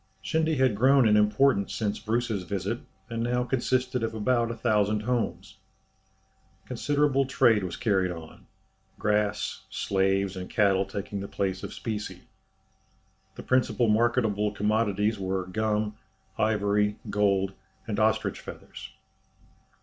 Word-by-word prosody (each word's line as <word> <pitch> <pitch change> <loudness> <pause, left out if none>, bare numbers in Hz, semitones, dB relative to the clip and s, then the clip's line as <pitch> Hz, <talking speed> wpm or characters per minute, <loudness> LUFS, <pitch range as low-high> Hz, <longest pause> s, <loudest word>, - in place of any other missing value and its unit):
Shendy 160 +3 +1
had 130 -3 +3
grown 130 +2 +5
in 105 - +5
importance 105 0 +3
since 105 -3 -2
Bruce's 115 -2 -1
visit, 100 +5 -3 0.3
and 115 0 -2
now 125 +1 +1
consisted 125 0 0
of 115 0 -2
about 115 +2 +1
a 115 - -4
thousand 105 -2 +1
houses. 105 -5 -2 1.1
Considerable 140 +2 +1
trade 115 -6 +3
was 90 -2 -4
carried 95 -5 +1
on 80 -3 -9 0.5
grass, 105 -1 0
slaves, 95 0 0
and 90 0 -6
cattle 100 -2 +3
taking 100 +1 -5
the 100 - -5
place 95 -2 -2
of - - -6
specie. 105 -2 -5 1.1
The - - -8
principal 130 -2 +2
marketable 105 -2 +2
commodities 105 0 0
were 95 -1 -2
gum, 105 +2 -1 0.4
ivory, 105 -1 +1
gold, 100 -2 +1 0.3
and 105 -1 -3
ostrich 110 0 +1
feathers. - - -10
105 Hz, 125 wpm, -27 LUFS, 100-120 Hz, 1.1 s, grown